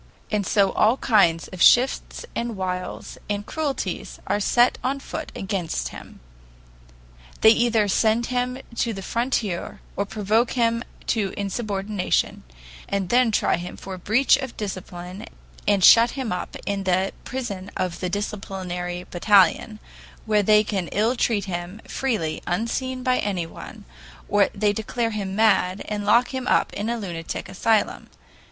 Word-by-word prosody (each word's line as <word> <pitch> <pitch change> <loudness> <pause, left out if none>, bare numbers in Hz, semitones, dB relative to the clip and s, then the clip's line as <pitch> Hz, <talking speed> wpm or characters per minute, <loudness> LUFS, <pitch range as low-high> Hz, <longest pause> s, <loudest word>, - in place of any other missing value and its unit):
And 205 -3 0
so 200 -3 +3
all 225 +4 +3
kinds 185 -11 +3
of 185 -2 -8
shifts 250 +2 +4
and 235 -3 -3
wiles 185 -1 -4
and 205 0 -2
cruelties 300 0 -3
are 205 - 0
set 240 +4 +3
on 270 +2 -1
foot 315 +3 -6
against 195 -6 -2
him. - - -12 1.2
They 220 - +8
either 230 -2 +3
send 220 +4 +2
him 250 +1 -1 0.2
to 230 - 0
the 195 -1 -7
frontier 230 -6 -2 0.2
or 200 - -1
provoke 215 +3 +1
him 230 -1 +1 0.2
to 205 -4 -1
insubordination, 200 -1 -1 0.5
and 195 -3 -1
then 245 -1 +4
try 215 - +2
him 175 +1 -7
for 190 -1 -7
breach 240 +9 +4
of 265 -3 -6
discipline 185 0 -6 0.4
and 200 -2 +3
shut 230 +5 +8
him 260 -6 -2
up 180 - -4
in 200 -1 -2
the 185 +1 +1
prison 205 -7 -5
of 180 -2 -2
the 180 - -2
disciplinary 180 -3 -4
battalion, 200 +3 +3 0.5
where 215 -1 +3
they 210 +1 +5
can 195 -5 -2
ill 220 +5 +1
treat 220 -4 +1
him 180 +2 -5
freely 215 -13 -2
unseen 250 +7 -2
by 255 0 +2
anyone, 180 -5 -5 0.4
or 205 -1 +3
they 205 0 +2
declare 225 +2 -2
him 195 -3 -4
mad, 205 -3 +2
and 205 -1 -3
lock 235 +4 +4
him 260 -2 -4
up - - +2
in 210 +3 -3
a 235 - -1
lunatic 170 -6 -5
asylum. 220 +3 0
205 Hz, 145 wpm, -24 LUFS, 190-235 Hz, 1.2 s, They